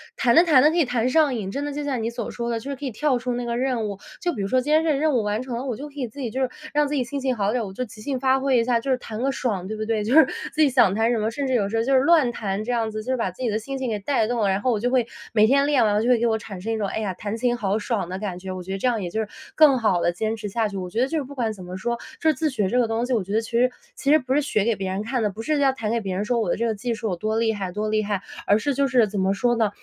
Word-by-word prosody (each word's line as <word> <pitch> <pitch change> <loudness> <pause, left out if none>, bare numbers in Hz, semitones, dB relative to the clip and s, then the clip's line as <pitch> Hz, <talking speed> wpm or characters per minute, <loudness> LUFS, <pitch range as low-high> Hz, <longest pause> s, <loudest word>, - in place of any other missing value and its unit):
弹 235 -2 +3
着 335 - +8
弹 300 -7 +5
着 305 - +6
可 340 - -1
以 335 - +5
弹 245 -2 0
上 285 -1 +3
瘾， 195 -4 -4
真 280 +7 -3
的 290 - -3
就 295 +1 -4
像 265 -5 -2
你 225 - -1
所 235 -1 -5
说 235 0 -4
的， 230 -1 -1
就 280 +5 -6
是 - - -3
可 280 - -13
以 270 - -1
跳 255 +2 0
出 250 0 -2
那 245 0 -3
个 235 - -2
任 250 -3 0
务。 200 -1 -6 0.2
就 350 -1 -1
比 210 - -4
如 195 - -1
说 255 +4 +2
今 295 +4 0
天 315 +1 +4
这 320 - +2
个 280 - +1
任 310 -1 +2
务 240 - +2
完 210 +3 -1
成 255 -2 -5
了， 245 - -4
我 255 -4 -3
就 290 +2 -7
可 - - -21
以 255 - -2
自 230 +6 -12
己 245 -5 -3
就 260 - -2
是 260 - +1 0.2
让 295 0 +3
自 295 - -2
己 260 - +1
心 275 +4 -4
情 260 -2 0
好 205 -1 0
点 245 +1 0
儿， - - -5
我 190 - -8
就 250 +6 -4
即 215 -1 -13
兴 265 +2 -2
发 265 0 +3
挥 265 -1 +2
一 230 - +3
下， 235 0 +2
就 270 - -5
是 260 - +3
弹 225 -2 -7
个 275 - +1
爽， 205 -9 -2
对 215 +2 -5
不 215 - -3
对？ 220 -1 0
就 230 +6 +1
是 320 -2 +9 0.3
自 310 - -9
己 290 - +5
想 235 -7 +4
弹 225 +2 +2
什 235 - +1
么， 215 +1 0
甚 275 +5 -3
至 260 - -1
有 205 -5 +1
时 225 - -1
候 225 - +2
就 270 - +1
是 260 - +6
乱 290 -3 +4
弹 205 -3 -3
这 245 - -3
样 230 -2 0
子， 215 0 -5
就 260 - -3
是 - - 0
把 230 - -1
自 185 +8 -8
己 240 - +1
的 215 +1 0
心 270 +5 -5
情 265 -1 -3
给 210 - -2
带 225 +2 +1
动 240 0 -1
了。 200 - +2
然 190 +1 +1
后 250 +3 +1
我 220 - 0
就 245 +3 0
会 250 -2 +2 0.3
每 215 -1 +5
天 275 +2 +4
练 280 -5 +3
完 210 0 +2
就 230 - -1
会 245 - +5
给 235 - 0
我 220 -1 +1
产 195 -4 -9
生 225 +3 -3
一 - - -1
种， 205 -2 -1
哎 220 - -3
呀， 205 -4 -2
弹 205 +4 -5
琴 240 +1 +1
好 205 -3 0
爽 220 -3 -2
的 185 - -4
感 190 -4 -4
觉， 190 +1 -8
我 185 -1 -6
觉 190 - -7
得 195 - -2
这 250 - 0
样 230 -3 +1
也 175 - -3
就 220 - -3
是 215 - -4 0.3
更 295 -4 +6
好 200 -7 +2
地 175 - +2
坚 220 +5 -1
持 210 -1 -5
下 220 +2 0
去。 200 - -6
我 180 -1 -4
觉 225 +6 -1
得 260 - +3
就 320 - -2
是 295 - -1
不 280 +2 -11
管 230 -4 -1
怎 195 -4 -9
么 180 +1 -7
说， 235 +5 -2 0.2
就 320 - +3
是 310 - +4
自 310 +3 -1
学 210 -8 -1
这 245 - +2
个 235 - +3
东 225 +2 -1
西， 255 - -5
我 225 - +2
觉 200 +3 -6
得 220 - +2
其 225 - -9
实， 240 +2 +3 0.3
其 275 - -2
实 310 - +7
不 265 -3 -2
是 295 - +3
学 245 -8 0
给 230 +1 +2
别 190 0 -3
人 190 +2 -2
看 240 +2 -1
的， 210 - +1
不 210 +3 -7
是 300 +5 0
要 275 -1 +4
弹 225 -4 -3
给 235 - +1
别 195 -3 -4
人 200 - -1
说 240 +2 0
我 225 - -1
的 - - +2
这 235 - -1
个 225 - +1
技 230 +3 -3
术 220 -1 -3
有 180 - -1
多 215 +4 -1
厉 225 -1 +2
害， 195 -3 -4
多 215 +1 -2
厉 215 0 +2
害， 205 -2 -2 0.2
而 205 - +4
是 280 +6 -1
就 275 +1 +1
是 245 -3 +4
怎 200 - -3
么 190 +1 +2
说 240 +4 +1
呢？ 220 -2 +2
235 Hz, 415 characters per minute, -23 LUFS, 210-260 Hz, 0.3 s, 是